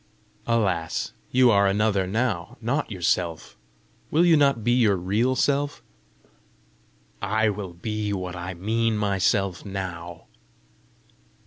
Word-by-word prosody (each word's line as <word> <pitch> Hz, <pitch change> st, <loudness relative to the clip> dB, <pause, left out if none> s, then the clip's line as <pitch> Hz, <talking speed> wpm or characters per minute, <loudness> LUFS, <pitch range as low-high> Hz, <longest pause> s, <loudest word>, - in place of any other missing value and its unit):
"Alas, 95 Hz, -8 st, 0 dB, 0.2 s
you 125 Hz, -1 st, +5 dB
are 100 Hz, -1 st, +4 dB
another 100 Hz, -1 st, +1 dB
now, 110 Hz, +1 st, -2 dB
not 135 Hz, +6 st, -1 dB
yourself! 85 Hz, -3 st, -1 dB, 0.5 s
Will 165 Hz, +3 st, +3 dB
you 170 Hz, -2 st, +6 dB
not 140 Hz, -6 st, +3 dB
be 120 Hz, -, +2 dB
your 115 Hz, -5 st, +4 dB
real 105 Hz, +8 st, 0 dB
self?" 145 Hz, +1 st, 0 dB, 1.4 s
"I 110 Hz, +2 st, +1 dB
will 100 Hz, -3 st, -5 dB
be 105 Hz, +3 st, -3 dB
what 90 Hz, -2 st, -4 dB
I 90 Hz, +1 st, -6 dB
mean 110 Hz, +4 st, 0 dB
myself 100 Hz, -2 st, 0 dB
now." 90 Hz, -4 st, -6 dB
105 Hz, 115 wpm, -25 LUFS, 95-115 Hz, 1.4 s, you